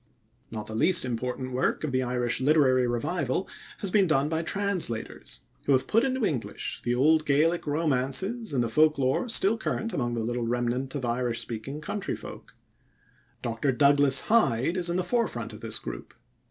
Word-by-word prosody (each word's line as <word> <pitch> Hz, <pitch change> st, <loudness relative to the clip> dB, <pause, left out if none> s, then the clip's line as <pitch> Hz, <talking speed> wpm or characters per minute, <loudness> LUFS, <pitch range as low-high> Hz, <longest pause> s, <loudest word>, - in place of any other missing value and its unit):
Not 110 Hz, -1 st, -6 dB
the 110 Hz, -, -8 dB
least 170 Hz, +8 st, +5 dB
important 125 Hz, +1 st, -3 dB
work 130 Hz, +4 st, 0 dB
of 155 Hz, -, -2 dB
the 130 Hz, 0 st, +1 dB
Irish 125 Hz, -1 st, -1 dB
Literary 130 Hz, -3 st, +4 dB
Revival 130 Hz, +6 st, -1 dB, 0.3 s
has 195 Hz, -, -1 dB
been 195 Hz, -2 st, +4 dB
done 145 Hz, -2 st, +2 dB
by 160 Hz, 0 st, -1 dB
translators, 180 Hz, -, -2 dB, 0.3 s
who 140 Hz, -, +4 dB
have 130 Hz, -, +2 dB
put 225 Hz, -, +2 dB
into 260 Hz, -3 st, 0 dB
English 130 Hz, -, -3 dB
the 120 Hz, 0 st, 0 dB
old 155 Hz, +5 st, +4 dB
Gaelic 155 Hz, +4 st, +1 dB
romances 155 Hz, -, -1 dB
and 130 Hz, -4 st, +1 dB
the -, -, -1 dB
folklore 150 Hz, -, +2 dB
still 225 Hz, 0 st, +2 dB
current 225 Hz, 0 st, -3 dB
among 120 Hz, -3 st, -1 dB
the 115 Hz, -, -2 dB
little 120 Hz, 0 st, -2 dB
remnant 125 Hz, +3 st, -2 dB
of 135 Hz, -3 st, -3 dB
Irish 120 Hz, -1 st, -1 dB
speaking 130 Hz, +6 st, -6 dB
country 195 Hz, +6 st, -3 dB
folk. -, -, -11 dB, 0.9 s
Dr. 120 Hz, +4 st, 0 dB
Douglas 140 Hz, +1 st, +4 dB
Hyde 170 Hz, -, +2 dB
is 180 Hz, -2 st, +1 dB
in 170 Hz, -, -1 dB
the 185 Hz, -, +1 dB
forefront 175 Hz, -, -2 dB
of 105 Hz, -, -11 dB
this 115 Hz, -2 st, -2 dB
group. -, -, -8 dB
135 Hz, 175 wpm, -27 LUFS, 120-170 Hz, 0.9 s, least